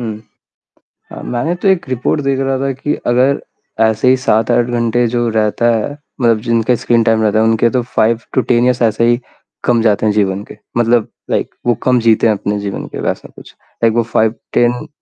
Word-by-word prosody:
हुँ। 110 -3 -5 0.9
अ, - - -8
मैंने 140 +9 -2
तो 185 +3 -1
1 185 -7 +1
रिपोर्ट 130 +4 -1
देख 135 -1 0
रहा 135 0 0
था 135 0 -1
कि 135 +3 -3
अगर 130 +3 +2 0.4
ऐसे 110 +2 +2
ही 130 - +5
7-8 115 0 +1
घंटे 120 0 0
जो 120 0 0
रहता 110 +1 0
है 110 +6 -2 0.3
मतलब 115 -3 +3
जिनका 115 0 +1
स्क्रीन 115 0 +1
टाइम 110 -1 +2
रहता 110 0 +2
है, 110 - +3
उनके 115 +1 +2
तो 125 -2 0
5 115 -1 0
टू 130 - +3
10 120 +1 +2
एयर्स 125 -1 +1
ऐसे 115 +1 +2
ही 120 +1 +2 0.4
कम 120 -2 +2
जाते 110 -1 +2
हैं 105 - +3
जीवन 100 -1 0
के, - - -13 0.2
मतलब 120 -1 +2 0.2
लाइक - - -1
वो 120 - +3
कम 125 -1 +3
जीते 115 0 +3
हैं 110 - +3
अपने 105 +1 -3
जीवन 100 -1 -5
के - - -7
वैसा - - -3
कुछ। - - -14 0.3
लाइक 115 - +3
वो 120 - +2
5 110 0 +2 0.2
10 120 +4 +1
120 Hz, 210 wpm, -15 LUFS, 110-125 Hz, 0.9 s, ही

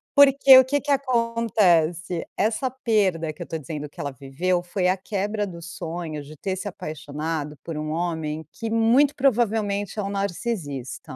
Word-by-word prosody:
Porque 275 -1 +8
o 260 - +7
que 285 +2 0
que 290 - -8
acontece, 220 - +1
essa 220 +5 0
perda, 205 -10 0
que 150 - -14
eu - - -13
tô 165 - -3
dizendo 150 0 -6
que 145 - -19
ela 145 - -3
viveu, 145 +8 -1
foi 180 +1 -1
a 185 +1 +2
quebra 205 +2 -2
do 170 -3 -9
sonho 165 -2 -5
de 150 +2 -12
ter 190 +5 -3
se 190 +2 -5
apaixonado 155 -4 -5
por 165 -2 -5
um 155 0 -3
homem 160 -2 -2
que 225 - -5
muito 235 +6 +4
provavelmente 215 -6 +1
é - - 0
um 195 - -3
narcisista. 175 - -4
185 Hz, 170 wpm, -24 LUFS, 160-225 Hz, -, Porque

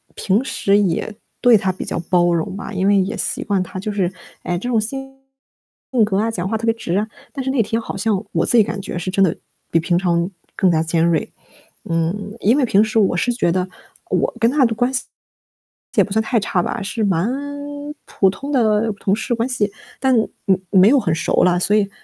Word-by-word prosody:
平 205 +6 +1
时 200 -6 +1
也 205 +2 -1 0.3
对 245 -2 +6
他 190 -1 0
比 185 - -7
较 - - -3
包 175 -1 +3
容 170 +3 -2
吧， 205 - -7
因 190 +1 0
为 200 0 +5
也 195 +4 -1
习 - - -2
惯 200 -3 0
他 185 +1 -7
就 210 +2 -3
是 190 -3 0 0.3
哎， 175 0 -1
这 245 - -5
种 230 -3 +2
性 270 +4 -6 0.9
格 195 -2 -1
啊、 225 +2 +1
讲 185 -3 -3
话 220 - 0
特 230 - -4
别 225 - +3
直 185 -6 -3
啊， 215 +1 0 0.3
但 270 -3 -4
是 - - -1
那 260 -4 +2
天 225 +3 -1
好 225 - -6
像 210 -1 0
我 - - +1
自 240 - +3
己 215 - +7
感 205 0 -4
觉 185 - -5
是 180 +2 -3
真 195 0 +3
的 170 - +2 0.4
比 165 - +4
平 170 +1 0
常 175 -1 +1 0.3
更 185 -3 +3
加 160 -1 +2
尖 165 0 +1
锐。 165 -3 0 0.6
嗯， 175 +5 -2
因 230 +8 +3
为 270 - +3
平 205 -2 +4
时 220 +1 -1
我 195 -3 +2
是 245 - +1
觉 200 -8 +1
得， 185 +1 0 0.4
我 - - +1
跟 230 - +4
他 280 -3 +4
的 230 - +1
关 245 +3 +1
系， 260 - -1 0.9
也 - - +5
不 200 - -7
算 220 +2 +2
太 230 +1 +1
差 185 -3 0
吧， - - -3
是 220 +2 -2
蛮 190 0 +1 0.8
普 195 - +2
通 275 +9 -6
的 220 -4 +2
同 195 +1 +1
事 240 - -2
关 235 +2 -1
系。 210 -5 0 0.3
但， 260 -2 +3 0.3
嗯， 190 -1 +3
没 190 +2 +6
有 275 0 +5
很 165 -8 0
熟 - - +1
了， 180 -1 +3
所 205 +3 +2
以 200 -2 +2
205 Hz, 245 characters per minute, -20 LUFS, 185-225 Hz, 0.9 s, 己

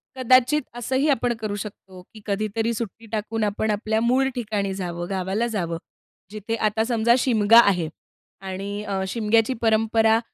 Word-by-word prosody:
कदाचित 255 +3 +4
असंही 260 +4 0
आपण 245 -3 +1
करू 215 -2 -3
शकतो 190 -3 -12
की 215 - -13
कधीतरी 215 +3 -1
सुट्टी 230 0 -6
टाकून 220 0 -2
आपण 210 +1 0
आपल्या 215 +1 -1
मूळ 255 +3 +2
ठिकाणी 210 -5 -2
जावं, 175 -2 -4
गावाला 195 +4 -1
जावं. 175 -7 -3 0.5
जिथे 215 +1 -4
आता 220 0 0
समजा 235 0 +2
शिमगा 230 -3 +5
आहे 180 -8 +3 0.5
आणि 195 +2 -5
अ, 195 -2 -2
शिमग्याची 225 +3 +1
परंपरा 225 0 +3
220 Hz, 145 wpm, -23 LUFS, 200-230 Hz, 0.5 s, शिमगा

